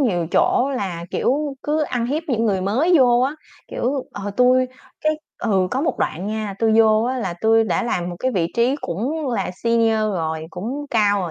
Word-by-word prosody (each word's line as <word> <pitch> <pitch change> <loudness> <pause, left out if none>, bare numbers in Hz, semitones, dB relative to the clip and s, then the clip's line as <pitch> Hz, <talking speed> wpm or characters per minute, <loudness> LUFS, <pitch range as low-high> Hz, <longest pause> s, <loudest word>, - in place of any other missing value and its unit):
nhiều 180 -11 +1
chỗ 265 +3 +3
là, 175 -6 -4
kiểu, 285 +2 0
cứ 305 +1 0
ăn 245 -5 -1
hiếp 295 +6 -1
những 230 -4 +1
người 200 -4 +1
mới 255 - +2
vô 245 -2 +5
á. 265 +4 +1 0.3
Kiểu, 260 +2 -2
ờ, 205 0 -5
tui 255 +1 +4 0.3
cái 310 - +2 0.3
ừ, 195 -5 +1
có 260 - -1
một 325 - -1
đoạn 180 +5 -2
nha, 215 -1 -3
tui 225 -1 +2
vô 220 -1 +5
á 255 +2 -1
là 190 -7 -3
tui 225 0 +4
đã 230 - 0
làm 180 -7 -2
một 175 - -7
cái 260 - 0
vị 175 -6 +1
trí 245 +4 +2
cũng 260 - -3
là 235 - -1
senior 230 -1 +2
rồi, 165 -7 -2
cũng 250 +11 -5
cao 205 -3 +3
rồi 175 -3 -3
230 Hz, 205 wpm, -21 LUFS, 200-260 Hz, 0.3 s, vô